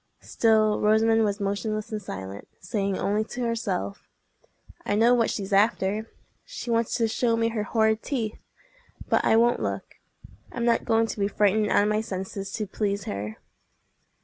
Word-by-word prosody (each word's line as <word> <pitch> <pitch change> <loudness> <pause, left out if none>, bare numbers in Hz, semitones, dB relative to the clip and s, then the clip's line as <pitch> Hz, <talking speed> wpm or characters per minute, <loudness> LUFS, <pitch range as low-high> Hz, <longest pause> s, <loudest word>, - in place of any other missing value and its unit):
Still 215 -2 +2
Rosamond 225 +1 +4
was 205 -1 0
motionless 205 +2 -2
and 215 -1 -3
silent, 95 - -7
saying 195 +1 -2
only 210 +2 0
to 250 - -6
herself, 230 - -3 0.7
"I 205 - 0
know 230 +3 +5
what 235 -2 +2
she's 200 -1 -3
after! 210 +1 +2 0.3
She - - -6
wants 230 -1 +1
to 230 -2 +2
show 230 +1 +1
me 230 0 +1
her 225 -2 -2
horrid 220 +1 +1
teeth. 230 -7 -3 0.7
But - - +2
I - - +4
won't 235 +1 +3
look. - - -4 0.5
I'm 235 -1 -3
not 235 -1 +2
going 225 0 +3
to 220 - -6
be 200 - +2
frightened 210 +1 +2
out - - +4
of 210 - +1
my 215 0 +1
senses 195 -2 -5
to 215 - -2
please 200 0 -2
her." 105 - -5
215 Hz, 170 wpm, -26 LUFS, 200-225 Hz, 0.7 s, know